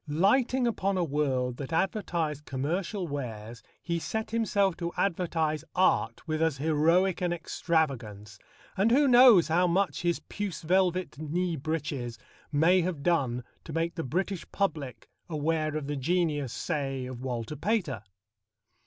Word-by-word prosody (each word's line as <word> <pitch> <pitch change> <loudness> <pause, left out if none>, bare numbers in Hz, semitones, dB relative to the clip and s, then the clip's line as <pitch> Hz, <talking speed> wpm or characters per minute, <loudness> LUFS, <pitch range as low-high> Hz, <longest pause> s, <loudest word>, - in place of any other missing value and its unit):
Lighting 235 - +2
upon 195 -4 0
a 180 - +2
world 135 -5 0
that 140 0 -6
advertised 165 -4 -1
commercial 175 +8 -2
wares, 115 -5 -6 0.2
he 170 -1 -1
set 220 +6 -3
himself 200 -5 +1
to 170 -1 -3
advertise 165 -5 0
art 185 -1 +1
with, 155 0 -1
as 160 -4 +1
heroic 165 +6 +2
an 175 -1 +1
extravagance, 130 - -2 0.4
and 200 +3 +3
who 280 +4 +4
knows 245 -8 +7
how 175 +3 +3
much 185 +3 +1
his 175 -1 0
puce 195 -5 -5
velvet 180 -2 +1
knee 170 +3 -1
breeches 140 -5 -3 0.3
may 165 +5 +4
have 170 -5 -3
done 130 -8 +1 0.2
to 160 - -8
make 165 +1 -1
the 165 - -4
British 185 +6 -2
public 145 - -2 0.2
aware 155 0 -1
of 150 - -4
the 145 +1 -3
genius, 150 -3 0
say, 135 -3 -3
of 125 -1 -7
Walter 125 +1 -4
Pater? 160 - -1
165 Hz, 145 wpm, -28 LUFS, 140-185 Hz, 0.4 s, knows